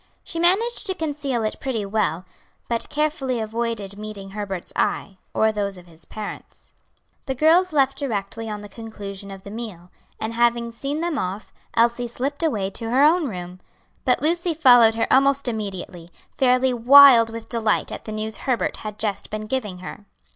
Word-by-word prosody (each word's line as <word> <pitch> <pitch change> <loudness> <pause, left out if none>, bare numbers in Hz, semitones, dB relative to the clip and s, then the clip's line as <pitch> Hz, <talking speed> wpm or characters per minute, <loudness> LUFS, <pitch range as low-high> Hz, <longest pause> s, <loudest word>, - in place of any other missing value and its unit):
She 330 - -3
managed 425 +7 +2
to 380 - +2
conceal 285 -7 -2
it 215 - -2
pretty 240 -6 -2
well, 195 -4 -1 0.4
but 230 -1 -1
carefully 295 -4 -1
avoided 220 -2 -3
meeting 205 -2 -7
Herbert's 195 -3 -4
eye, 195 -2 -1
or 220 0 +2
those 200 -2 -3
of 180 - -13
his 165 -2 -12
parents. 215 -1 -9 0.5
The 265 - -1
girls 330 +6 +4
left 275 -2 +2
directly 225 -4 -3
on 210 -1 -5
the 205 - -9
conclusion 200 -2 -8
of 195 -1 -10
the 200 - -9
meal, 205 -6 -8 0.3
and 220 +1 -3
having 235 0 +1
seen 280 +6 -4
them 335 -3 -1
off, 190 +3 -5 0.2
Elsie 235 +1 +2
slipped 270 +6 -4
away 210 -12 0
to 225 +3 -5
her 260 +4 +3
own 320 +1 +4
room. 180 -4 -7 0.4
But - - +2
Lucy 340 +1 +1
followed 245 -7 +6
her 225 - +1
almost 275 0 +3
immediately, 190 -6 -5 0.3
fairly 255 0 +3
wild 245 -1 +8
with 225 0 -8
delight 225 -3 0
at - - -7
the 215 - -6
news 215 0 -3
Herbert 255 -4 -1
had 210 -1 -7
just 210 -3 -3
been 215 0 -5
giving 215 -5 -3
her. 205 - -9
230 Hz, 175 wpm, -23 LUFS, 205-270 Hz, 0.5 s, wild